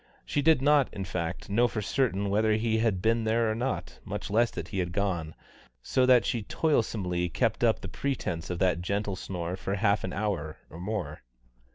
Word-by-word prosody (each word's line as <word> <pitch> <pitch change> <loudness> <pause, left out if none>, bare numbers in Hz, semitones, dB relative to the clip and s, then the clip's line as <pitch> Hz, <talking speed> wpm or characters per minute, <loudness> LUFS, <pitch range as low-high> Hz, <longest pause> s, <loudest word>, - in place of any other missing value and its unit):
She 145 - 0
did 150 -3 +4
not, 145 -2 +4
in 95 - -5
fact, 90 -1 -4
know 115 +5 +3
for 110 - -3
certain 100 -3 0
whether 110 +1 +3
he 110 +1 +1
had 105 -5 +1
been 115 +1 +2
there 110 0 +2
or - - 0
not, 125 +4 -3
much - - -5
less 115 +2 +4
that - - -6
he 100 - -3
had 90 -1 -2
gone, 90 -5 -1 0.5
so 130 -1 +2
that 125 -2 +6
she 120 - 0
toilsomely 100 - 0
kept 115 +4 0
up 115 -2 +3
the 95 - -6
pretence 90 -8 -3
of 90 - -2
that 90 -1 +2
gentle 100 +2 -1
snore 90 -2 -4
for 95 +1 -3
half 100 0 +2
an 95 - -3
hour 90 -7 -2
or 85 - -9
more. 90 -6 -4
105 Hz, 200 wpm, -28 LUFS, 90-115 Hz, 0.5 s, that